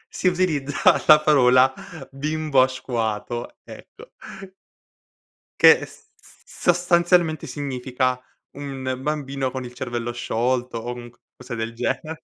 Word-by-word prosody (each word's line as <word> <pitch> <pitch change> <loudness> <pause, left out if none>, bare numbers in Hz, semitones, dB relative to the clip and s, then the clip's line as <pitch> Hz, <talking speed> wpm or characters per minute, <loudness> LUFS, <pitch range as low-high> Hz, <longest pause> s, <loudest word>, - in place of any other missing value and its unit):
Si 185 - 0
utilizza 160 -6 +2
la 150 0 +9
parola 130 -3 +4 0.4
"bimbo 150 0 0
asquato", 120 -3 -3
ecco - - -13 1.5
che - - +7
s - - -17 0.2
s - - -20 0.2
sostanzialmente 175 -2 +2
significa: 130 -2 -2 0.4
un 130 -2 -5
bambino 140 -3 -3
con 130 -1 -5
il 125 0 -9
cervello 120 -2 -4
sciolto, 120 +1 -2
o 120 +2 -5
un 120 -1 -10
qualcosa 125 +1 -12
del 115 +1 -4
gene 155 +6 -4
130 Hz, 115 wpm, -22 LUFS, 120-150 Hz, 1.5 s, la